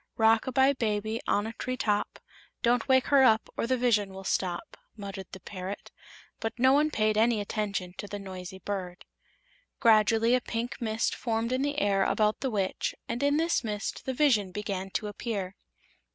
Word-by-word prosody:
"Rock 225 +1 +4
a - - -1
bye, 265 +2 +4
baby, 220 -2 -1
on 205 - +2
a 225 - -5
tree 255 +2 -4
top; 210 -3 0 0.5
Don't 240 +2 +2
wake 260 -1 +5
her 275 - +7
up 220 -4 +4
or - - -1
the 255 +1 +2
vision 210 -6 +1
will 195 - -8
stop," 180 -2 -2 0.2
muttered 195 -2 -7
the 190 - -8
parrot; 185 +2 -7 0.5
but 225 - -4
no 260 +2 +5
one 300 +2 +4
paid 215 -5 +1
any 230 0 +3
attention 200 -3 -3
to 205 - -5
the 205 - -5
noisy 190 -2 -8
bird. 190 -2 -5 0.7
Gradually 225 0 +4
a 250 - +3
pink 235 +1 -4
mist 220 -1 0
formed 230 0 -2
in 255 +1 +1
the 290 +1 -1
air 200 -7 +2
about 215 +1 +1
the 265 - -1
Witch 195 -5 -1
and 240 - -3
in 285 +1 +3
this 330 -2 +1
mist 210 -2 -4
the 260 - -1
vision 230 -10 +3
began 195 -1 -4
to 210 - -2
appear. 205 -3 -4
220 Hz, 185 wpm, -28 LUFS, 200-245 Hz, 0.7 s, her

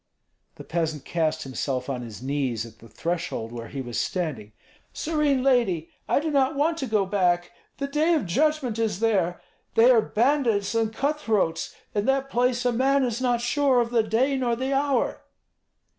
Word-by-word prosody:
The - - -10
peasant 160 -4 -2
cast 160 -2 -1
himself 130 -1 -3
on 130 -3 -3
his 115 0 -9
knees 130 -5 -1
at 110 -1 -14
the 115 - -15
threshold 165 -4 -3
where 115 -1 -7
he 135 - -5
was 120 -2 -4
standing. 145 - -3 0.4
"Serene 300 -4 +1
lady, 230 -12 +2 0.2
I - - +3
do 310 +1 -2
not 275 0 +2
want 320 +4 +1
to 265 - -2
go 215 -3 +2
back; 180 -3 +1 0.3
the 280 - -2
day 305 +4 +2
of 295 - 0
judgment 265 - 0
is 220 -5 0
there. 195 -6 +1 0.4
They 230 +3 +7
are 235 -3 +5
bandits 230 -3 +1
and 225 -1 +1
cut 285 +6 -1
throats; 205 - 0 0.2
in 205 0 0
that 270 0 +1
place 245 0 +1
a 245 - +3
man 270 +3 +2
is 240 -1 -1
not 245 -2 +1
sure 265 +1 +2
of 235 -1 0
the 235 -2 +4
day 230 +6 +1
nor 245 -2 0
the 260 +3 -2
hour." 275 -2 0
225 Hz, 185 wpm, -25 LUFS, 170-270 Hz, 0.4 s, They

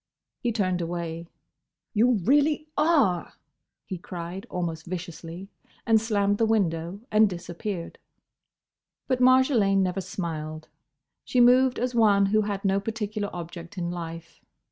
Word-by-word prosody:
He 240 - -1
turned 185 -5 0
away. 170 -1 -4 0.7
"You 240 +3 +4
really 295 - +3
are—!" 285 - +2 0.5
he 185 -3 -6
cried, 175 +2 -7
almost 165 -3 -4
viciously; 170 +1 -7 0.4
and 220 -1 +4
slammed 205 -2 +1
the 225 - +4
window, 180 -3 0
and 215 0 +5
disappeared. 175 +1 -6 1.1
But 255 -1 0
Marjolaine 250 -7 +4
never 185 +1 -1
smiled. 160 -5 -5 0.5
She 250 - 0
moved 250 +1 +5
as 250 +1 -1
one 210 -4 +4
who 215 +2 +3
had 205 -1 -3
no 195 0 +3
particular 210 -1 -3
object 170 +2 -8
in 175 -1 -2
life. 165 -1 -7
195 Hz, 125 wpm, -26 LUFS, 170-225 Hz, 1.1 s, and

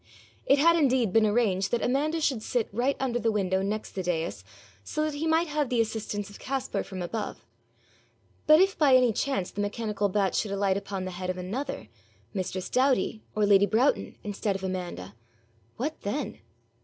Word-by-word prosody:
It 275 - +6
had 335 +4 +5
indeed 255 - +2
been 225 -1 +5
arranged 205 -4 +1
that 240 - 0
Amanda 300 +6 +1
should 265 -7 +1
sit 235 0 -1
right 245 +7 0
under 245 -3 0
the 230 -1 +1
window 190 -3 0
next 210 +2 -3
the 190 - -4
dais, 170 - -2 0.4
so 305 - -2
that 310 - -2
he 300 +3 -2
might 320 +1 +3
have 295 -4 -1
the 245 - +1
assistance 215 -2 -2
of 205 - -12
Caspar 265 0 -2
from 185 -2 -6
above; 215 +5 -5 1.0
but 310 +1 +8
if 385 +1 +4
by 280 -4 +5
any 250 -3 +4
chance 235 -7 -1
the 205 - -3
mechanical 210 0 -1
bat 195 -1 +1
should 215 - 0
alight 200 -1 +1
upon 195 -1 -4
the 185 - -4
head 185 +1 -5
of 185 - -2
another, 245 +10 -4 0.5
mistress 185 -2 -3
Doughty 255 -4 +1
or 210 -1 +3
lady 200 0 +5
Broughton 245 +7 +1
instead 205 0 -2
of 190 - -5
Amanda 175 - -4 0.6
what 300 +6 -3
then? 210 +9 -3
215 Hz, 185 wpm, -27 LUFS, 195-265 Hz, 1.0 s, but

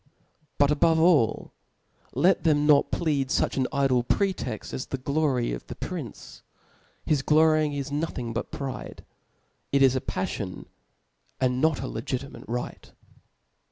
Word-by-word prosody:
But 145 0 +4
above 160 +2 +3
all, 160 -9 +3 0.6
let 175 +8 +3
them 150 -3 +3
not 150 -2 +5
plead 145 -5 0
fuch - - +1
an 130 -1 +1
idle 135 -3 +2
pretext 130 - -2
as 130 - -4
the 135 - -3
glory 135 - 0
of - - -7
the - - -7
prince.: - - -7 0.6
bis 150 -3 +2
glory 155 +1 +4
lax 140 0 -4
nothing 145 -6 -3
but 120 - -3
pride; 135 -2 -6 0.7
it 140 0 +4
is 135 -1 +5
a 130 - 0
paflion, 95 0 -4 0.7
and 125 +1 +1
npt 160 -3 +2
a 110 - -4
Irgit^ 130 +1 -3
mate - - -11
right. 120 +2 -5
140 Hz, 145 wpm, -26 LUFS, 125-155 Hz, 0.7 s, not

